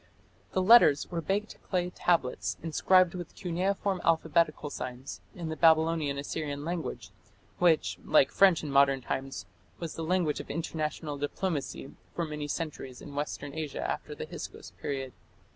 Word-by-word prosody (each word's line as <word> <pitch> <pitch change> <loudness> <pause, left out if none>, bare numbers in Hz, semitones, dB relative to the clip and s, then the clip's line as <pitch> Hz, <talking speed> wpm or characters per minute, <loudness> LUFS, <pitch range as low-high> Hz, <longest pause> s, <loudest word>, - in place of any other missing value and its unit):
The 185 - +2
"letters" 190 -10 +6
were 170 -1 -2
baked 200 +6 -2
clay 180 -1 0
tablets 170 -8 0
inscribed 180 +2 +4
with 175 -2 -7
cuneiform 190 +1 -1
alphabetical 160 -2 +2
signs 125 +1 -6
in 170 -3 -5
the 160 - -3
Babylonian 160 -3 +3
Assyrian 145 0 -4
language, 170 -1 -4 0.5
which, 170 -3 +3
like 145 -3 +4
French 190 -5 +5
in 150 - -4
modern 140 -1 +4
times, 135 -2 -4 0.3
was 165 -2 -5
the 165 - -5
language 170 -2 +1
of - - -8
international 155 -2 -3
diplomacy 145 -2 -3 0.2
for 170 - -1
many 150 -1 -4
centuries 145 -5 -5
in 145 - -10
Western 145 0 -4
Asia 155 -2 -3
after - - -4
the - - -5
Hyksos - - -8
period. 135 -2 -3
160 Hz, 145 wpm, -29 LUFS, 145-175 Hz, 0.5 s, letters